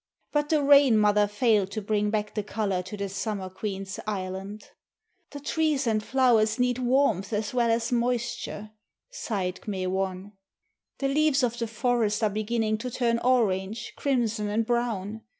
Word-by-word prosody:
But 295 0 0
the 305 -2 +2
Rain 280 -4 +6
mother 210 0 +4
failed 210 -2 +2
to 215 - -3
bring 210 0 0
back 210 -1 -2
the 210 - -1
colour 205 -3 -2
to 185 +3 -8
the 200 0 -3
Summer 195 -1 -4
Queen's 195 -1 -5
island. 195 +1 -4 0.7
"The 285 - -8
trees 300 -1 0
and 215 -2 +1
flowers 240 -4 +3
need 250 0 +1
warmth 245 -6 +1
as 215 +4 -2
well 240 -2 +2
as 230 +1 0
moisture," 240 -3 -2 0.4
sighed 195 - -3
K'me 190 -3 -3
wan. 190 +1 -2 0.7
"The 275 - -1
leaves 295 0 +2
of 240 0 0
the 230 - -1
forest 225 -1 0
are 215 - +2
beginning 215 +1 -1
to 250 +2 -4
turn 235 -1 0
orange, 215 -4 0
crimson, 230 -6 0
and 220 +2 0
brown. 225 -3 -2
220 Hz, 160 wpm, -27 LUFS, 205-245 Hz, 0.7 s, Rain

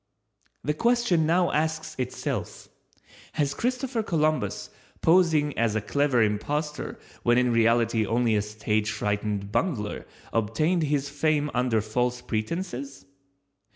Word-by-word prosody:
The 150 +5 0
question 230 -4 +2
now 175 +1 +3
asks 155 0 -1
itself: 125 -1 -4 0.6
Has 145 -2 0
Christopher 250 - -1
Columbus, 155 - 0 0.3
posing 160 -4 +4
as 115 -2 +2
a - - +2
clever 135 +1 +2
impostor 150 +9 -2 0.2
when 120 0 +3
in 125 -1 +3
reality 115 0 +3
only 115 0 +2
a 105 - +2
stage 105 0 -1
frightened 105 -1 -2
bungler, 110 - -1 0.3
obtained 135 - +1
his 145 -2 0
fame 150 0 0
under 125 -3 +1
false 125 +3 -1
pretenses? 135 - -4
135 Hz, 120 wpm, -26 LUFS, 110-155 Hz, 0.6 s, posing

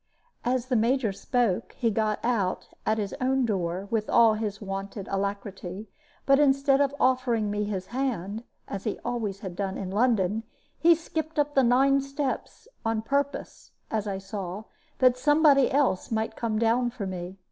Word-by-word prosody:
As 250 0 0
the 255 -1 0
Major 235 0 +2
spoke, 235 -1 0
he 230 -2 0
got 215 0 0
out 205 -7 0 0.2
at 220 - +2
his 205 -3 -3
own 260 0 +2
door 185 -2 -2
with 220 -2 0
all 230 -2 +6
his 210 -2 -3
wonted 195 0 -5
alacrity; 200 0 -4 0.3
but 275 0 +5
instead 275 -1 +4
of 280 0 +1
offering 245 -5 +2
me 210 0 -1
his 195 -3 -3
hand, 225 -5 -3 0.2
as 195 -1 -6
he 215 - -1
always 210 -5 -2
had 185 -3 -6
done 195 0 -3
in 190 -1 -5
London, 215 -2 +2 0.4
he 335 0 +6
skipped 320 -1 -5
up 295 0 +1
his 270 -2 +5
nine 270 +3 +4
steps, 275 - -4 0.2
on 225 -1 0
purpose 280 +3 -2 0.2
(as 215 -1 -1
I 195 -1 -2
saw) 195 0 -6 0.3
that 255 -1 +4
somebody 295 -1 +5
else 265 -9 +1
might 220 -1 -1
come 225 -2 -1
down 235 +2 +2
for 230 -4 -6
me. 185 0 -6
225 Hz, 170 wpm, -27 LUFS, 200-260 Hz, 0.4 s, all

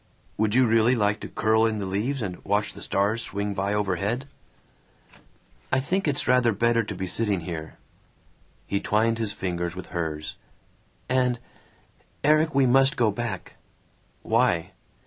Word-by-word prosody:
"Would 110 +1 0
you 130 0 +5
really 115 +2 +4
like 105 -2 +1
to - - -7
curl 110 +1 +2
in 110 -1 -1
the 100 - -3
leaves 110 +8 -2
and 90 -3 -6
watch 105 +1 0
the - - -11
stars 105 +4 0
swing 100 -1 -3
by 100 +1 -1
overhead?" 105 +5 -1 1.5
"I 130 - +3
think 185 +7 -1
it's 145 -1 -1
rather 125 -2 +4
better 115 +3 +2
to 100 - -6
be 95 +1 -3
sitting 100 0 +1
here!" 80 -2 -6 0.9
He 100 - -1
twined 115 +3 +1
his 110 -2 +1
fingers 85 -3 -3
with 95 - -8
hers. 80 -3 -4 0.7
"And 125 -1 +1 0.9
Erik, 155 +1 +3
we 135 -1 +5
must 135 +3 +4
go 115 -3 +3
back." 105 -3 -5 0.7
"Why?" 110 -7 +1
110 Hz, 150 wpm, -25 LUFS, 100-125 Hz, 1.5 s, you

